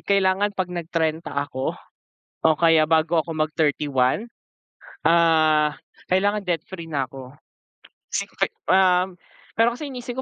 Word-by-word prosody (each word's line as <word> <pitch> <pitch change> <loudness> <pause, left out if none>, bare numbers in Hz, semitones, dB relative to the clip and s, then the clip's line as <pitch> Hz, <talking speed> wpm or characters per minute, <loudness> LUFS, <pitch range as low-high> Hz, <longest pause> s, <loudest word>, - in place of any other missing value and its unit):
"Kailangan 200 +1 +1
'pag 185 -1 -2
nag-trenta 165 -2 -2
ako, 140 -2 -2 0.7
o 160 - +6
kaya 165 -2 +5
bago 160 +1 +2
ako 165 - -5
mag 155 -1 0
31, 145 - +1 0.8
ah, 160 -2 +3 0.3
kailangan 205 +3 +2
debt-free 170 -1 -4
na 140 -4 -1
ako." 135 +1 -12 0.8
Sing - - -1
fe - - 0 0.2
Um, 185 -1 +3 0.4
pero 230 +1 +4
kasi, 285 +4 -7
iniisip 250 -1 -6
165 Hz, 125 wpm, -23 LUFS, 155-190 Hz, 0.8 s, o